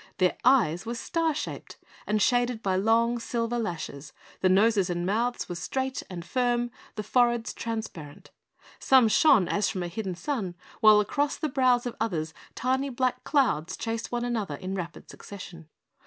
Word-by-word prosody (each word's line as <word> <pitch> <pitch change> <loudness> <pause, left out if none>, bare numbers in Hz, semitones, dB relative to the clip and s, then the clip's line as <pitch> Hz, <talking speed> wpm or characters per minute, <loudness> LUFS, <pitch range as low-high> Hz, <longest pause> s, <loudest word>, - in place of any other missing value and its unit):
Their 185 -1 +2
eyes 215 - +4
were 235 +1 -4
star 325 +5 -1
shaped - - -6 0.3
and 210 0 +1
shaded 245 +1 +1
by 190 -1 +1
long, 230 +4 +2
silver 235 0 -2
lashes, 160 -8 -5 0.3
the 185 - +3
noses 200 0 +3
and 175 0 -2
mouths 235 +5 -1
were - - -4
straight 265 +9 -3
and 175 -2 -7
firm, 240 0 0 0.2
the 215 - -4
foreheads 240 +1 +2
transparent. 215 -10 -6 0.5
Some 260 -3 +5
shone 215 - +5
as 205 +2 +1
from 185 - -3
a - - -3
hidden 185 +1 -4
sun, 200 - -3 0.2
while 215 -1 +7
across 285 +7 -1
the 310 - -2
brows 255 -3 +2
of 245 - -4
others 160 -8 -2 0.2
tiny 265 +2 0
black 255 0 -1
clouds 225 - +1
chased 230 0 -4
one 240 0 -1
another 220 -10 -2
in 185 +6 -5
rapid 175 -3 -6
succession. 175 -5 -11
225 Hz, 165 wpm, -27 LUFS, 185-245 Hz, 0.5 s, while